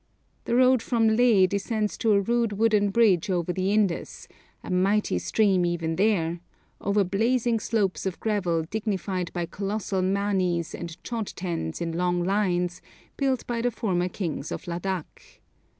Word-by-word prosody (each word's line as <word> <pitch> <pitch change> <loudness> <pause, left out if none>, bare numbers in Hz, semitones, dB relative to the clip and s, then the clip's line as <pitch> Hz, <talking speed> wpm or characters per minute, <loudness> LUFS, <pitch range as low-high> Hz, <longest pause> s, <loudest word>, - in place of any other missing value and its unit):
The 235 - 0
road 255 -1 +5
from 225 -2 +2
Leh 225 -5 +5
descends 205 +2 -1
to 220 -2 +3
a 200 - +4
rude 235 +1 0
wooden 210 -1 +2
bridge 200 -3 +3
over 180 -1 0
the 190 +1 0
Indus, 205 -5 -1 0.4
a - - -6
mighty 190 - +2
stream 195 - +2
even 165 -2 -1
there, 175 -4 +1 0.4
over 200 +1 +1
blazing 230 +5 +1
slopes 205 -4 -1
of 185 - -4
gravel 180 -7 0
dignified 190 -2 -3
by 175 -1 -2
colossal 200 +1 -3
manis 185 -3 0
and 170 -2 -7
chod 230 -4 -3
tens 170 - -4
in 170 -1 -2
long 175 +1 0
lines, 180 -2 0 0.3
built 265 -2 0
by 235 -1 -2
the 245 - +2
former 185 -6 -1
kings 165 -5 -4
of - - -6
Ladak. 175 0 -5
195 Hz, 150 wpm, -26 LUFS, 175-220 Hz, 0.4 s, road